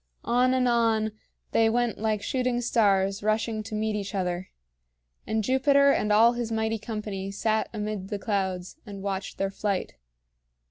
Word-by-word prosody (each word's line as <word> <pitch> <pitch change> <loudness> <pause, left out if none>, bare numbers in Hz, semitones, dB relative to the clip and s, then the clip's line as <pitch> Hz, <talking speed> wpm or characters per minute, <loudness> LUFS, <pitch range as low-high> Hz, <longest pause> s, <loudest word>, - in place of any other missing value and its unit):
On 250 +2 +3
and 255 -1 +2
on 225 -2 +2 0.4
they 225 0 +4
went 240 0 0
like 215 -1 -1
shooting 250 -2 0
stars 200 -5 +2
rushing 215 +1 0
to 215 0 -6
meet 215 0 -1
each 200 -1 -4
other; 180 -1 -2 0.8
and 220 0 0
Jupiter 280 +3 +4
and 210 -5 +1
all 225 +3 +6
his 240 -1 -3
mighty 220 0 0
company 210 -3 -5
sat 215 +2 0
amid 210 -3 -4
the 205 - -2
clouds 190 -3 -2
and 200 -3 -9
watched 195 -1 -4
their 195 0 -1
flight. 200 -1 -2
215 Hz, 155 wpm, -27 LUFS, 200-235 Hz, 0.8 s, all